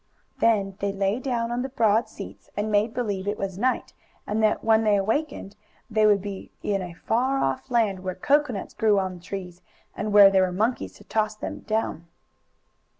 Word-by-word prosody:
Then 200 -4 +2
they 200 0 -1
lay 195 +3 0
down 240 -3 -2
on 240 +1 -1
the 265 - -3
broad 225 -3 +2
seats - - -10
and 210 +1 -1
made 210 +2 +2
believe 205 -5 -3
it 205 +1 -1
was 195 -1 -4
night 255 +3 0 0.3
and 215 +2 -1
that, 215 -1 +2
when 225 0 +4
they 210 -2 +4
awakened, 220 +1 -1 0.4
they 215 0 +4
would 200 -2 +3
be 200 -2 -6
in 200 -2 0
a 180 -2 -6
far 255 +9 0
off 135 - -1
land 220 -6 +1
where 185 -1 -4
coconuts 285 -7 0
grew 215 -3 +3
on 185 -2 -2
trees 180 0 -7 0.3
and 210 0 -3
where 200 -1 +8
there 190 -1 +4
were 185 -1 +1
monkeys 220 +7 -1
to - - -16
toss 215 -1 -1
them - - -6
down. 215 -6 -2
210 Hz, 190 wpm, -25 LUFS, 195-230 Hz, 0.4 s, where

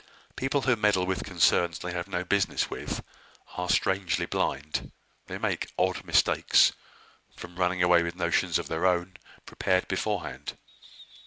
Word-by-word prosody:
People 135 +2 0
who 130 -2 +2
meddle 105 -4 +2
with 95 0 -2
concerns 85 -3 +2
they 90 - -5
have 85 +1 -4
no 90 -2 -2
business 100 +2 0
with, - - -5 0.5
are 90 0 -3
strangely 95 -1 +1
blind, 75 +2 -2 0.4
they - - -5
make - - -2
odd - - 0
mistakes, - - +4 0.6
from 85 0 -10
running 90 0 +1
away 90 -1 +5
with 85 0 -3
notions 90 - +1
of - - -5
their 80 +3 0
own, 90 0 0 0.3
prepared 95 -1 0
beforehand. 65 +3 -3
90 Hz, 145 wpm, -27 LUFS, 85-95 Hz, 0.6 s, away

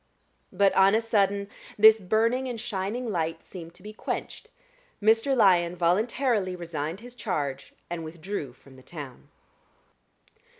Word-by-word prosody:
But 195 +1 +3
on 195 +2 +5
a - - +4
sudden 200 -3 +1 0.3
this 220 +1 +8
burning 230 +6 +1
and 240 -3 -5
shining 215 +3 -3
light 165 -3 -2
seemed 170 -2 -10
to 185 - -17
be 210 +1 -8
quenched: - - -5 0.5
Mr. 225 +5 +3
Lyon 180 -5 +4
voluntarily 200 +3 +1
resigned 165 +1 -5
his 245 +1 -11
charge 145 - -3 0.2
and 170 -1 -5
withdrew 160 -3 -6
from 130 +1 -18
the - - -14
town. 145 -2 -10
190 Hz, 135 wpm, -27 LUFS, 170-220 Hz, 0.5 s, this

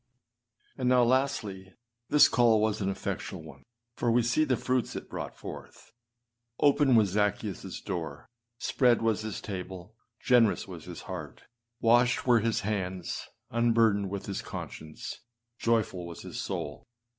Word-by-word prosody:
8. - - -8
And 125 - +2
now, 125 -1 +5
lasdy, 115 -7 0 0.3
this 150 0 +7
call 115 -3 +4
was 110 -1 0
an 95 - 0
effectual 100 - -4
one, - - -12 0.3
for 120 - 0
we 120 +1 +4
see 120 +7 +2
the 130 -5 +1
fruits 130 -1 -1
it - - -6
brought - - -5
forth. - - -10 0.7
Open 140 -2 +4
was 105 -5 +4
Zaccheusâs 105 -2 -2
door; 80 -6 -5 0.3
spread 120 -2 +2
was 110 -2 +1
his 110 -2 -4
table; 95 0 -7 0.3
generous 120 -6 +3
was 90 -4 -9
his - - -8
heart; - - -7 0.4
washed 120 +1 +4
were 120 -2 +5
his 115 +1 0
hands; 95 -4 -3 0.2
unburdened 115 -4 +3
was 100 0 -5
his 100 - -3
conscience; 75 -1 -7 0.4
joyful 110 -6 0
was 85 -2 -9
his - - -5
soul. 75 0 -5
110 Hz, 145 wpm, -29 LUFS, 95-120 Hz, 0.7 s, this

